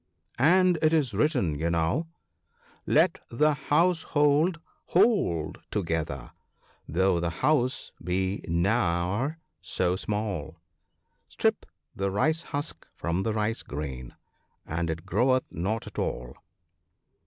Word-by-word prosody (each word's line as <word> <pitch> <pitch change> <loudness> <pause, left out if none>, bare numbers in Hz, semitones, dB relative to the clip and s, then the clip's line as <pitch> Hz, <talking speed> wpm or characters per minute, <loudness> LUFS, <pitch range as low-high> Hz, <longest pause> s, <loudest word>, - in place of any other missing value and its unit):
" - - -49
* - - -22 0.2
And 180 -2 +3
it 155 0 +3
is 145 -8 +2
written, 100 - +1
you 85 +1 0
know, 85 - 0 0.4
" - - -33
Let - - +4
the 150 +6 +3
household 160 +1 +2 0.3
hold 175 - +2
together, 80 - -2 0.6
though 95 +1 +2
the 85 0 0
house 130 - +1
be 95 +3 -1
ne'er 95 - +1 0.2
so 90 -1 0
small; 95 -6 -3 0.7
Strip - - 0 0.3
the 100 0 -1
rice 155 +12 +1
husk 145 -1 -6
from 85 +2 -1
the 110 +2 -1
rice 110 +2 0
grain, 65 -4 -6 0.5
and 85 +1 -2
it 80 +1 -4
groweth 130 +6 +2
not 105 +7 -2
at - - -7
all." - - -3
100 Hz, 120 wpm, -27 LUFS, -, 0.7 s, Let